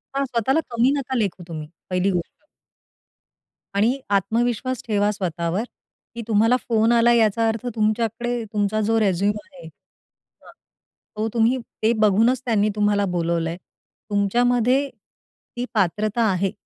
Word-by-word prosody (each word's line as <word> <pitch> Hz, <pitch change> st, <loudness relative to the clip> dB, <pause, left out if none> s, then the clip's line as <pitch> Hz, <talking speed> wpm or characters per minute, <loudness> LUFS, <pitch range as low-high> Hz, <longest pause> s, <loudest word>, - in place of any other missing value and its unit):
हां. 275 Hz, 0 st, +1 dB
स्वतःला 255 Hz, +4 st, +1 dB
कमी 235 Hz, +3 st, +3 dB
नका 260 Hz, -1 st, -3 dB
लेखू 195 Hz, -5 st, -2 dB
तुम्ही, 155 Hz, -2 st, -6 dB, 0.2 s
पहिली 185 Hz, +1 st, +1 dB
गोष्ट. 175 Hz, -, -8 dB, 1.3 s
आणि 230 Hz, +7 st, +2 dB
आत्मविश्वास 235 Hz, +5 st, 0 dB
ठेवा 205 Hz, -1 st, +2 dB
स्वतःवर 180 Hz, 0 st, -2 dB, 0.5 s
की 235 Hz, -, -4 dB
तुम्हाला 225 Hz, +3 st, +3 dB
फोन 225 Hz, 0 st, +3 dB
आलाय 235 Hz, 0 st, +4 dB
याचा 225 Hz, +1 st, +2 dB
अर्थ 225 Hz, +1 st, -2 dB
तुमच्याकडे 230 Hz, +2 st, -1 dB
तुमचा 210 Hz, +1 st, 0 dB
जो 225 Hz, +2 st, +2 dB
रेझूम 200 Hz, 0 st, +2 dB, 0.2 s
आहे. 275 Hz, -, -13 dB
हां. 160 Hz, -, -20 dB, 0.7 s
तो 215 Hz, -, 0 dB
तुम्ही 235 Hz, +3 st, +3 dB, 0.3 s
ते 225 Hz, -, +4 dB
बघूनच 225 Hz, +5 st, +3 dB
त्यांनी 215 Hz, -3 st, +2 dB
तुम्हाला 205 Hz, -1 st, +2 dB
बोलावलंय. 170 Hz, 0 st, -1 dB, 0.5 s
तुमच्यामध्ये 245 Hz, +6 st, +2 dB, 0.7 s
ती 245 Hz, -, -2 dB
पात्रता 215 Hz, +3 st, +1 dB
आहे 190 Hz, +1 st, 0 dB
215 Hz, 125 wpm, -22 LUFS, 200-235 Hz, 1.3 s, आलाय